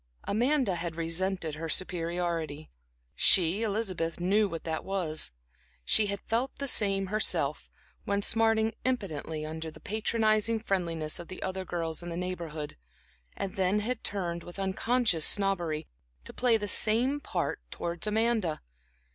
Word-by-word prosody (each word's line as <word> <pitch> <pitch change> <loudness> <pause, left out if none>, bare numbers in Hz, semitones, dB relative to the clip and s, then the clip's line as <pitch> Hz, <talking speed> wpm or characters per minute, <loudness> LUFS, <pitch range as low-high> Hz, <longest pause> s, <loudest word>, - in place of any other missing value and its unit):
Amanda 245 0 +2
had 170 -1 -4
resented 165 0 -1
her 160 +2 -5
superiority; 170 -3 -2 0.4
she, 185 +3 +5
Elizabeth, 195 -7 -2
knew 200 +4 +3
what 165 -2 -5
that 160 -1 -3
was. 170 - 0 0.5
She 215 - +4
had 200 -1 -3
felt 240 +4 -1
the 280 0 -3
same 195 -5 +4
herself, 215 +3 +1 0.3
when 200 0 0
smarting 225 0 +4
impotently 160 - -2
under 160 +1 -5
the - - -13
patronizing 220 +1 +1
friendliness 170 -7 -1
of 175 - -8
the 185 - -7
other 190 0 -3
girls 165 -2 -3
in 175 - -6
the 170 - -4
Neighborhood, 170 -4 -5 0.6
and 195 +1 -4
then 190 +2 +2
had 230 +2 -3
turned, 175 -4 -2
with 175 +2 -10
unconscious 195 -2 +2
snobbery, 175 -6 +1 0.4
to - - -9
play 245 -2 +3
the 205 -1 -4
same 235 +8 +3
part 290 - -2
towards 170 +4 -3
Amanda. 220 -6 +1
190 Hz, 140 wpm, -29 LUFS, 165-215 Hz, 0.6 s, she